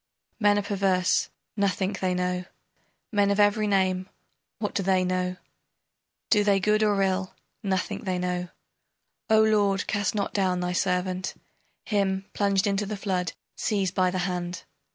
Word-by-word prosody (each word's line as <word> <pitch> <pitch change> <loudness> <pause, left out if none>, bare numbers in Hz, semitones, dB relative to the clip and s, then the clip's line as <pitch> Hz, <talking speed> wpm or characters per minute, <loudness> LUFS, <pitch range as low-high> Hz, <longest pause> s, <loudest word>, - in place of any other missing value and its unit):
Men 205 -1 +4
are 205 - 0
perverse, 195 -2 +1 0.3
nothing 200 -1 0
they 185 -1 +1
know. 180 0 -1 0.7
Men 205 -2 +3
of 200 +1 +1
every 210 +1 +4
name, 185 -1 +1 0.5
what 210 -2 -3
do - - 0
they 190 -1 +2
know? 180 0 -1 0.9
Do 210 -2 +5
they 200 -1 +3
good 210 +3 +2
or 210 -2 +3
ill, 190 0 -1 0.3
nothing 190 -3 -1
they 185 -3 -1
know. 180 0 -2 0.8
O 220 0 +6
lord, 205 -3 +2
cast 205 -1 -1
not 200 -1 -1
down 185 -3 +1
thy 180 0 -1
servant! 180 0 -1 0.5
Him, 195 -2 0
plunged 200 -2 +2
into 200 0 0
the 210 0 -4
flood, 180 -4 -1 0.2
seize 195 -4 0
by 185 -1 +2
the 185 - -2
hand! 180 -1 -3
195 Hz, 155 wpm, -26 LUFS, 185-205 Hz, 0.9 s, O